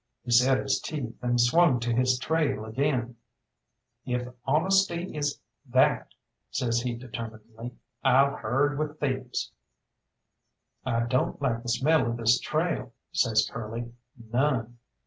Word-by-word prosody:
He 120 - -5
set 125 +3 +5
his 135 - 0
teeth 135 -7 -5
and 120 0 +1
swung 130 +2 +4
to 120 0 0
his 125 +1 +2
trail 140 -6 0
again. 125 0 -1 0.9
"If 125 0 -2 0.2
honesty 175 +4 +2
is 145 -1 -1 0.3
that," 130 +2 +2 0.3
says 120 -1 0
he 120 -1 -2
determinedly, 115 -1 -8 0.3
"I'll 135 +2 +4
herd 140 +6 0
with 155 0 -3
thieves." 130 -3 -2 1.3
"I 115 0 0
don't 125 +2 0
like 115 -5 0
the 120 - -6
smell 150 +5 +3
of 115 0 -2
this 115 +1 +3
trail," 155 -6 -2 0.2
says 115 -11 +2
Curly, 115 +1 -6 0.2
"none. 120 0 -1
125 Hz, 125 wpm, -27 LUFS, 115-145 Hz, 1.3 s, set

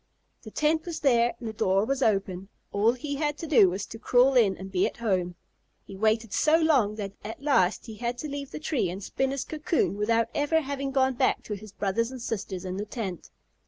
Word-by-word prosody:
The - - -10
tent 315 +2 0
was 335 -2 -4
there 240 -4 +3
and 235 - -6
the 220 - -4
door 195 -1 +2
was 275 +2 -1
open. 195 -4 0 0.2
All 210 +4 +3
he 285 +3 -4
had 295 0 -1
to 330 - -6
do 270 - +6
was 190 +2 -3
to 225 - -10
crawl 250 +3 +4
in 215 -7 +4
and 190 +1 -8
be 185 -1 +2
at - - -8
home. 185 -6 -1 0.5
He 195 - -10
waited 220 +1 +1
so 310 +7 +4
long 275 -11 +3
that 200 -2 -5
at 225 +6 -8
last 215 -10 +2
he 220 -3 -9
had 240 +1 -3
to 305 - -5
leave 280 -1 -5
the - - -7
tree 295 - -1
and 190 +3 -6
spin 265 +6 -1
his 275 0 -3
cocoon 310 - -1
without 230 +2 +2
ever 305 +2 +2
having 275 -1 -3
gone 265 -1 +2
back 245 - +1
to 210 - -5
his 210 0 -8
brothers 205 +3 -1
and 260 -1 -8
sisters 195 -5 -4
in 185 0 -4
the 205 - -3
tent. 205 -6 -6
230 Hz, 230 wpm, -27 LUFS, 200-275 Hz, 0.5 s, do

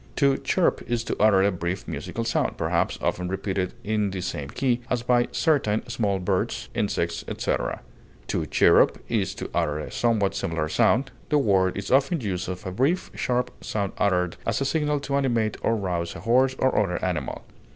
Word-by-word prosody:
To 140 -1 +3
chirp 185 - +1
is 120 -1 0
to - - -2
utter 100 -3 +5
a 100 - +3
brief 90 +2 -4
musical 80 +9 -4
sound, 115 - 0
perhaps - - 0
often 90 0 0
repeated 95 0 -2
in 105 -1 0
the 95 -1 -4
same 70 -5 -4
key, 125 - 0
as 120 -2 0
by 120 0 +3
certain 130 -9 +1
small 105 -4 0
birds, 90 -1 -1
insects, - - -1
etc. - - -2 0.5
To - - -1
chirrup - - +5
is - - 0
to - - -6
utter 75 -3 0
a 75 - -6
somewhat 110 -5 +1
similar 80 -4 -2
sound; 130 - +2 0.2
the 150 - +3
word 95 -8 +2
is 100 - -4
often 140 +6 +3
used 95 -6 -3
of 90 -1 -6
a 95 - -3
brief, 135 - 0
sharp 125 0 -1
sound 100 -3 -2
uttered 90 -3 +1
as - - 0
a 135 - 0
signal 150 0 +1
to 140 0 -1
animate 115 -6 +1
or 115 - +2
rouse 90 -5 -2
a - - -8
horse 130 +3 +3
or 130 - +2
other 90 -4 -1
animal. 85 -8 -3
105 Hz, 185 wpm, -25 LUFS, 90-125 Hz, 0.5 s, utter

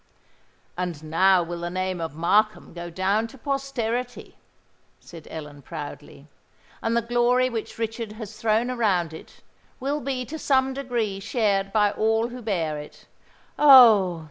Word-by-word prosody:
"And 175 -4 -4
now 180 +3 +3
will 170 0 -6
the 170 0 -4
name 185 0 -3
of 160 -3 -5
Markham 210 +7 +1
go 175 0 -7
down 195 +6 0
to 270 - -15
posterity," 250 -3 -3 0.6
said 165 -3 -13
Ellen, 150 -2 -8
proudly: 145 -1 -9 0.5
"and 230 +1 0
the 235 - +1
glory 240 +2 +2
which 225 -2 -5
Richard 225 -1 -4
has 215 -1 -9
thrown 225 +3 +1
around 190 -9 0
it, 160 - -13 0.4
will 285 +3 -2
be 255 -1 -3
to 315 +5 -7
some 265 -2 +2
degree 240 -7 -2
shared 195 -2 0
by 210 -1 +3
all 225 +2 +1
who 250 +1 -8
bear 165 -9 -2
it. 150 - -12 0.5
Oh! 225 - +7
215 Hz, 145 wpm, -24 LUFS, 175-240 Hz, 0.6 s, Oh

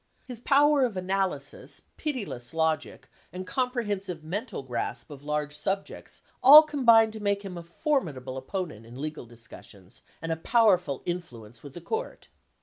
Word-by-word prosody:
His 245 -3 -8
power 285 +2 +4
of 230 -6 -1
analysis, 185 -6 -3
pitiless 205 - -4
logic, 160 -2 -1 0.2
and 185 +2 -6
comprehensive 205 -9 -2
mental 200 - -5
grasp 125 +4 -4
of 140 -1 -10
large 150 0 -2
sub 195 +6 -2
jects - - -12 0.2
all 290 +5 +11
combined 235 -7 +4
to 220 - -7
make 200 -1 -1
him 185 -2 -6
a 170 - -6
formidable 170 - -2
opponent 130 - -5
in 120 +3 -12
legal 150 -3 -5
discussions 110 -5 -13 0.2
and 165 0 -4
a - - +1
powerful 180 - +2
influence 120 -11 -6
with 140 -2 -11
the 175 - -8
court. 460 +3 -5
180 Hz, 150 wpm, -27 LUFS, 145-225 Hz, 0.2 s, all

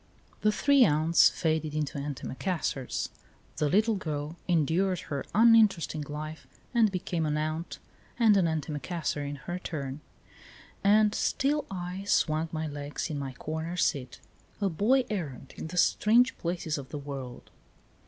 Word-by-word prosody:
The 215 - +4
three 280 +5 +4
aunts 160 -2 +5
faded 155 -2 -1
into 150 -2 -2
antimacassars; 140 0 -3 0.5
the 150 - +1
little 220 +7 +3
girl 150 -2 -4
endured 175 +2 +1
her 140 -2 -4
uninteresting 215 -8 +5
life 155 +1 -6 0.3
and 225 -4 +4
became 175 -2 -2
an 150 -1 0
aunt 155 +2 -3 0.4
and 225 -3 +5
an 185 -4 +3
antimacassar 155 0 -2
in 145 0 -4
her 175 +6 -5
turn, 140 -5 -5 0.8
and 210 +1 +5
still 290 +2 0
I 185 +1 -5
swung 160 -4 +1
my 160 0 -3
legs 145 +2 -4
in 145 - -3
my 135 -2 -5
corner 160 +6 -4
seat, 130 -6 -1 0.4
a 200 -2 +1
boy 240 +10 +2
errant 150 - -5
in - - -6
the 180 +3 -7
strange 235 +7 +4
places 165 -3 -2
of 135 - -9
the 150 - -5
world. 140 -3 -7
160 Hz, 145 wpm, -29 LUFS, 150-195 Hz, 0.8 s, aunts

